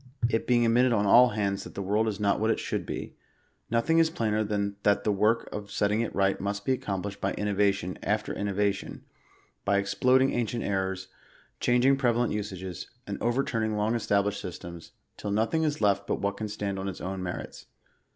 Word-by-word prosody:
It 115 - 0
being 120 -1 +4
admitted 120 +2 +4
on 105 -2 +2
all 120 +5 +7
hands 100 -2 -1
that - - -11
the - - -3
world 105 +4 +1
is 105 -3 -2
not 100 -1 +2
what 110 +1 +1
it - - +1
should - - -3
be, - - -5 0.6
nothing 120 +9 +2
is 165 -1 +4
plainer 110 -7 0
than 100 -1 -2
that 100 0 +2
the 105 - +2
work 105 +3 +2
of 105 -1 -6
setting 105 +2 +1
it 115 - -3
right 95 0 +1
must 100 +1 -3
be - - +1
accomplished 100 -5 -3
by - - 0
innovation 100 -3 0
after 105 +1 -1
inno 100 -1 -3
vation; 100 0 -1 0.6
by 100 0 +2
exploding 130 +7 +3
ancient 120 0 -1
errors, 95 -1 -2 0.5
changing 125 +3 +3
prevalent 120 -2 +1
usages, 95 -4 -5 0.2
and 100 - -5
overturning 115 -3 0
long 105 +2 +1
established 100 -3 0
systems, 85 -2 -8 0.2
till 105 - -5
nothing 110 +10 +1
is 150 -2 0
left^but 100 -1 +1
119 - - -10
what 100 0 0
can 110 - -3
stand 100 -2 -3
on 95 - -3
its 95 - -5
own 95 0 -4
merits. 90 -1 -6
105 Hz, 190 wpm, -28 LUFS, 100-115 Hz, 0.6 s, all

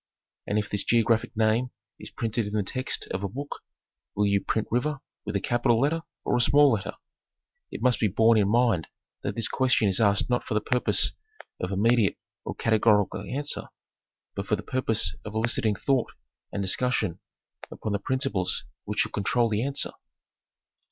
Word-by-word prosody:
And 105 - 0
if 105 -1 0
this 100 - -1
geographic 115 0 +2
name 110 +3 +2 0.3
is - - -9
printed 115 -1 -2
in 105 - -6
the 105 -1 +1
text 130 +7 -3
of 95 - -2
a 100 - -1
book, 140 +7 -6 0.6
will 105 - +2
you 100 -1 +2
print 110 - -1
river 145 +5 0 0.3
with 105 0 -4
a - - +2
capital 120 +2 +2
letter 150 +5 +1 0.2
or - - +1
a 120 - +3
small 145 +3 +6
letter? 105 -5 -1 0.8
It - - -7
must 125 -1 +3
be 110 - +3
borne 110 +3 +4
in 100 -1 +2
mind 115 - +2 0.3
that - - -3
this 115 - 0
question 130 -4 +2
is 95 +3 +2
asked 100 -2 +3
not 125 0 0
for 110 - -3
the - - +4
purpose 125 +3 +1 0.5
of 90 - -2
immediate 110 +1 +3 0.3
or - - -5
categorical 105 -3 +2
answer, 145 +2 -1 0.7
but 100 0 -5
for 105 - +2
the 105 - -7
purpose 120 -4 0
of 105 0 -8
eliciting 110 -1 +1
thought 130 +3 0 0.4
and 100 - -2
discussion 100 -3 0 0.5
upon 110 - -5
the 100 - 0
principles 130 -5 -1 0.2
which - - 0
should - - -2
control 115 +3 +1
the 105 0 0
answer. 140 +1 0
110 Hz, 180 wpm, -27 LUFS, 105-125 Hz, 0.8 s, small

